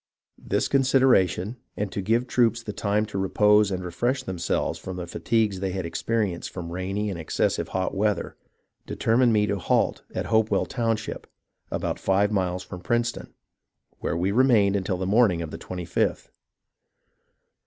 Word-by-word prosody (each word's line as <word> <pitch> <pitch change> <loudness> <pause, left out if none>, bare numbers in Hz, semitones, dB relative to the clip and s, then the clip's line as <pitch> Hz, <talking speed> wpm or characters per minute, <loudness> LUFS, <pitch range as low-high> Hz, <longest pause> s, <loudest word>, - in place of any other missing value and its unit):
This - - 0
consideration, 130 -7 +3 0.2
and 105 -2 -2
to 100 - -3
give 115 +5 +2
the - - -16
troops 115 -2 +2
time 105 0 -1
to 100 -2 -4
repose 105 +2 +4
and 95 -2 -3
refresh 120 +10 -1
themselves 95 -7 -2
from 95 - -6
the 90 - -4
fatigues 105 +2 0
they 95 -1 -2
had 95 -2 -3
experienced 100 +1 -2
from 85 -2 -7
rainy 95 +4 -2
and 90 - -5
excessive 80 - 0
hot 95 0 -2
weather, 105 +1 -1 0.5
determined 120 +2 +2
me 105 -1 +3
to 100 -1 -1
halt - - +1
at - - -2
Hopewell 110 -1 +2
town 115 -2 0
ship, 110 - -7 0.4
about - - -2
five 100 +2 +2
miles 90 -2 -1
from 90 -1 -9
Princeton, 120 +3 -2 0.6
where 85 - -2
we 90 +3 0
remained 110 -4 +4
until 95 -1 -1
the 95 - -3
morning 100 -4 +3
of 80 - -7
the - - -7
25th. 90 -2 -2
100 Hz, 160 wpm, -25 LUFS, 95-115 Hz, 0.6 s, repose